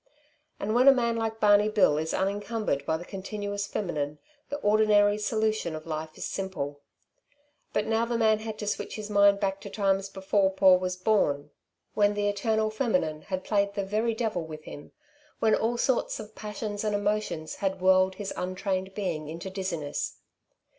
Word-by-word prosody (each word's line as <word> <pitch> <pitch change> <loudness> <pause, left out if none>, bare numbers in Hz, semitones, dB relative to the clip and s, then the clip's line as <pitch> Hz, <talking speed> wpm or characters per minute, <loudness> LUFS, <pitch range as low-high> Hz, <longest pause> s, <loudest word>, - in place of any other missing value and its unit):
And 215 +2 -1
when 250 +3 +4
a - - +12
man 235 -3 +1
like 225 -1 -2
Barney 210 0 +5
Bill 190 -8 +3
is 160 +1 -2
unencumbered 205 -4 -1
by 160 - +1
the 175 - -9
continuous 200 +1 -4
feminine, 150 -8 -3 0.3
the 285 - -3
ordinary 210 -1 +4
solution 215 -5 0
of 155 - -8
life 155 -1 -5
is - - -4
simple. 145 -7 -4 0.9
But 210 - 0
now 225 +1 +1
the 235 0 -1
man 220 -2 +3
had 220 -1 -6
to 210 - -5
switch 205 - -3
his 210 -1 -6
mind 200 -1 +5
back 195 -1 -1
to 200 - -7
times 195 -1 0
before 195 0 +1
Paul 190 -1 +5
was 185 0 -2
born, 150 -8 +1 0.4
when 205 0 +3
the 205 0 0
eternal 215 +1 0
feminine 180 - 0
had 185 -1 -4
played 200 -1 +1
the 200 - -1
very 220 +3 0
devil 220 -6 -1
with 155 -1 -8
him, 145 - -10 0.5
when 220 -1 +3
all 235 +2 +1
sorts 255 0 0
of 215 0 -9
passions 210 -1 -5
and 210 -1 0
emotions 205 -6 -2
had 190 -1 -1
whirled 185 0 +4
his 200 0 -5
untrained 190 +1 -3
being 170 -7 -3
into 170 +4 -6
dizziness. 170 -7 -3
200 Hz, 175 wpm, -28 LUFS, 185-215 Hz, 0.9 s, a